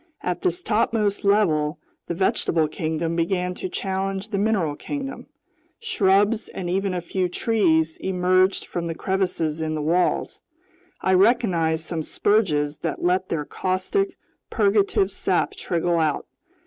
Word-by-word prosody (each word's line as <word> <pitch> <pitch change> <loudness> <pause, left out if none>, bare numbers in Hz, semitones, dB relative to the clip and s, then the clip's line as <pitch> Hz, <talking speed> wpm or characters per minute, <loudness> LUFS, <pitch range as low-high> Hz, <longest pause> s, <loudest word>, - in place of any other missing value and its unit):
At - - -2
this 365 -1 -1
topmost 215 -2 +1
level 170 -7 +2 0.3
the 170 - -3
vegetable 165 -3 +1
kingdom 160 +1 -2
began 180 +1 0
to 185 - -5
challenge 195 +2 -3
the 200 -3 -1
mineral 195 -8 +1
kingdom. 275 - -6 0.5
Shrubs, 210 - +2
and 185 - -5
even 190 +1 0
a 175 - -2
few 180 +1 -1
trees, 165 -7 +1
emerged 185 +1 +2
from 170 -1 -3
crevices 180 -4 -1
in 155 0 -1
the 155 - -2
walls. 175 +3 0 0.6
I 190 - +2
recognized 185 -6 +3
some 165 -1 -3
spurges 155 -6 +1
that - - -3
let 185 +1 +1
their 150 -3 -2
caustic, 350 - -1 0.3
purgative 200 -2 +2
sap 190 -1 0
trickle 170 0 0
out. 155 -2 0
185 Hz, 135 wpm, -23 LUFS, 165-200 Hz, 0.6 s, recognized